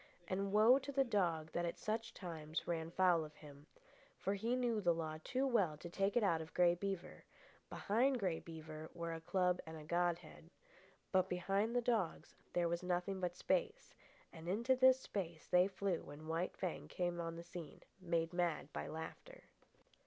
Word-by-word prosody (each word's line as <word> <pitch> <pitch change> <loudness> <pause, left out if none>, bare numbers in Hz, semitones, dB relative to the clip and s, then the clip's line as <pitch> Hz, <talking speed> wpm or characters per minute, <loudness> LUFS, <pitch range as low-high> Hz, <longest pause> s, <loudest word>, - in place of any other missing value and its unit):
And 195 +2 -1
woe 220 +6 +7
to 280 +1 -6
the 275 0 +3
dog 170 -9 0
that 170 - -1
at 170 - -2
such 225 +2 -2
times 160 -3 -5
ran 165 -1 -1
foul 175 -2 +4
of 150 0 -10
him. 145 -1 -13 0.7
He 230 +5 0
knew 240 -4 +1
the 175 -3 +3
law 155 -1 -3
too 260 +1 0
well 200 - +2
to 170 +2 -8
take 195 +4 +1
it 235 - +4
out 165 -5 +3
of 160 - -10
Grey 175 -1 +6
Beaver; 190 0 -4 0.5
behind 250 +6 +2
Grey 180 -6 0
Beaver 155 -1 -8
were 170 -1 -3
a 165 - -6
club 180 +1 +2
and 160 -1 -9
godhead. 170 -1 -1 0.6
But 185 -1 +3
behind 195 +6 0
the 245 - +2
dogs 225 -8 0 0.2
there 175 -1 +2
was 170 0 -1
nothing 180 +2 -1
but 180 -1 -2
space, - - -1 0.4
and 165 0 -9
into 235 +8 +2
this 260 0 +6
space 170 -9 -4
they 180 +1 +5
flew 195 -2 -1
when 145 +2 -10
White 165 +3 -1
Fang 185 -3 -3
came 175 -1 -1
on 165 0 -4
the 170 - -7
scene, 170 -3 -9 0.2
made 170 -1 0
mad 170 -4 0
by - - -3
laughter. 330 - -7
175 Hz, 180 wpm, -38 LUFS, 165-200 Hz, 0.7 s, woe